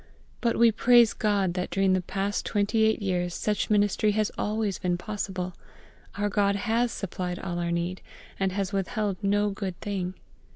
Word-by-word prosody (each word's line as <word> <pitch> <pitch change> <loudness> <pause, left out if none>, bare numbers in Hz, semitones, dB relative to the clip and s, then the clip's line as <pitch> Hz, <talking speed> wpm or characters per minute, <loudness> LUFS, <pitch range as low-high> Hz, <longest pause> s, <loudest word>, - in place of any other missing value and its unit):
But 235 -1 +1
we 235 0 +6
praise 240 0 +5
GOD 200 -4 +1
that 180 0 -2
during 195 -1 +2
the 185 - +2
past 200 +3 -2
twenty 215 +2 +1
eight 220 -1 +1
years 180 -2 -1
such 210 -1 -1
ministry 210 0 +3
has 215 0 +1
always 210 -2 -1
been 175 -1 0
possible; 190 -2 -4 0.6
our 205 0 +1
GOD 200 -1 +2
has 230 +3 +1
supplied 180 -2 -4
all 175 -2 -4
our 170 0 -1
need, 170 +2 -2 0.4
and 190 -1 +1
has 195 +1 -2
withheld 195 0 -1
no 205 +1 +2
good 195 -3 -5
thing. 190 -3 -3
200 Hz, 170 wpm, -27 LUFS, 185-210 Hz, 0.6 s, we